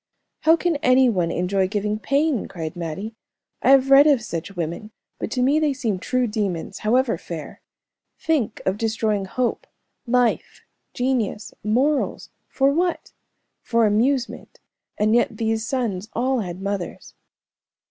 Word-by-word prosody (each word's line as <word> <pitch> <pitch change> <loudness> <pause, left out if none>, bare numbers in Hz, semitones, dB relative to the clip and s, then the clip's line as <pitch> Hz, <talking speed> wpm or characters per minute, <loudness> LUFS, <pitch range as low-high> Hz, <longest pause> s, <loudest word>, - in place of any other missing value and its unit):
"How 320 +1 +5
can 335 -2 0
any 255 -2 +4
one 180 -5 0
enjoy 185 +2 0
giving 210 +1 -2
pain," 280 +1 0
cried 160 -2 -6
Mattie. 175 +6 -5 0.5
"I - - +2
have 270 0 +5
read 280 +2 +8
of 275 -7 +3
such 185 0 -5
women, 170 +5 -4 0.3
but - - -3
to 250 +2 0
me 285 +4 +3
they 300 -2 +1
seem 230 -8 -2
true 255 +5 0
demons, 205 -7 -3
however 230 -3 +1
fair. 165 -3 -8 0.6
Think 310 -9 -1
of 190 +2 0
destroying 220 -3 0
hope, 245 +5 -2 0.4
life, 245 -1 +1 0.3
genius, 245 -5 -1
morals 260 +8 0 0.2
for 275 +1 +2
what? 350 +2 -1 0.5
For 230 -1 +2
amusement, 240 +5 0 0.4
and 215 +1 +2
yet 235 -2 +2
these 225 0 -1
sons 220 -6 -2
all 255 +2 0
had 185 -2 -5
mothers." 200 -3 -4
225 Hz, 140 wpm, -22 LUFS, 200-265 Hz, 0.6 s, read